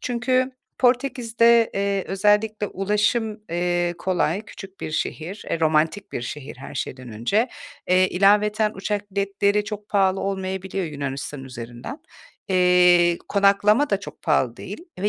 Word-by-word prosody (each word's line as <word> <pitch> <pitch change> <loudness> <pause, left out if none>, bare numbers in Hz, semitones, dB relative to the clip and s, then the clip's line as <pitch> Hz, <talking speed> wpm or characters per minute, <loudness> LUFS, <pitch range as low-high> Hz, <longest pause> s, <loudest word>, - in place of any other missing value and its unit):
Çünkü 255 +1 0 0.3
Portekiz’de, 235 -2 +3
eee, 200 -1 0
özellikle 210 +2 +1
ulaşım, 210 +3 0
eee, 175 0 0
kolay, 185 0 0
küçük 195 -2 -12
bir - - -4
şehir, 165 +5 -4
eee, 165 - -1
romantik 160 +5 +1
bir - - -3
şehir 135 +2 -7
her 135 +2 -10
şeyden 130 -1 -5
önce. 200 - +1 0.4
Eee, 185 +1 +4
ilaveten 210 +3 +3
uçak 205 +1 -3
biletleri 200 +1 +1
çok 210 0 -7
pahalı 195 -2 +2
olmayabiliyor 190 -1 -3
Yunanistan 140 -2 -5
üzerinden. 120 - -8 0.5
Eee, 180 -2 +5
konaklama 205 +6 +3
da 200 - +1
çok - - -11
pahalı 130 -7 +1
değil 205 - -8 0.2
ve 200 +3 +1
195 Hz, 130 wpm, -23 LUFS, 175-210 Hz, 0.5 s, Eee